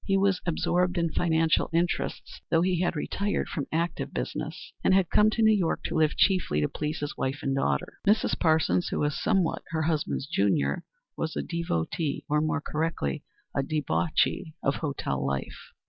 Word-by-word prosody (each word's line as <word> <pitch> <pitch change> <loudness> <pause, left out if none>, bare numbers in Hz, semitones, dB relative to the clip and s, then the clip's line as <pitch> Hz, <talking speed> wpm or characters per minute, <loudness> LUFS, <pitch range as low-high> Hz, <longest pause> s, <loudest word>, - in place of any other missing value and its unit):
He 195 -1 +2
was 195 -1 +2
absorbed 180 +2 +1
in 170 -1 +1
financial 160 -1 +2
interests, 170 +1 -1
though 165 0 +3
he 180 -1 +1
had 175 -1 +1
retired 200 +6 -1
from 145 - -4
active 170 +2 -1
business, - - -5
and 190 - +5
had 190 -3 +2
come 210 +1 +5
to 225 +1 0
New 220 0 +6
York 180 -5 0
to - - -3
live 155 -2 +2
chiefly 185 - +3
to 75 - +2
please 150 +1 -4
his 145 - -3
wife 135 +2 -2
and 135 - 0
daughter. 70 - -1
Mrs. 210 +2 +3
Parsons, 155 - +2
who - - -2
was 145 -1 0
somewhat 185 -4 +1
her 160 -1 -1
husband's 155 -3 -1
junior, 100 - +1 0.3
was 160 -1 -3
a - - -1
devotee, 165 - -2
or 150 +1 +2
more 155 0 0
correctly, 155 - -2 0.3
a - - +2
debauchee, 155 +3 0
of 135 - +1
hotel 135 - -2
life. 70 0 -4
160 Hz, 180 wpm, -27 LUFS, 140-175 Hz, 0.3 s, New